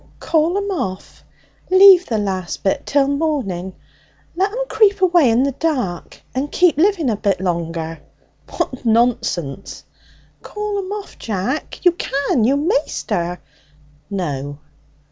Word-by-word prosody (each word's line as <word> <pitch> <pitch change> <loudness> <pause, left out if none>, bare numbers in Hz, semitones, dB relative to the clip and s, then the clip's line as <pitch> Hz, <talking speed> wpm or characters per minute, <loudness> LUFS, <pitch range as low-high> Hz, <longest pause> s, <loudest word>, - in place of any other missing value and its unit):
'Call 330 +3 +1
'em 405 0 -2
off! 190 - -5 0.5
Leave 375 -1 +7
the 225 - -1
last 190 -4 -3
bit 195 - -1
till 280 -1 +2
morning. 270 - -2 0.6
Let 385 +3 +1
'em - - -3
creep 410 -4 +3
away 350 -7 +4
in 230 +3 +3
the 280 - +1
dark 255 - -3
and 275 +3 -3
keep 355 -2 +3
living 350 -3 +2
a 225 - +1
bit 200 -2 0
longer!' 165 -3 -3 0.5
'What 255 - -4
nonsense!' 220 - 0 0.6
'Call 420 -1 -4
'em 380 0 -5
off, 415 -1 -7
Jack! 225 +7 -3
You 355 - +7
can. 275 -8 0
You'm 280 +5 +1
maister!' 180 - -1 0.7
'No.' 145 -8 -4
265 Hz, 130 wpm, -19 LUFS, -, 0.7 s, Leave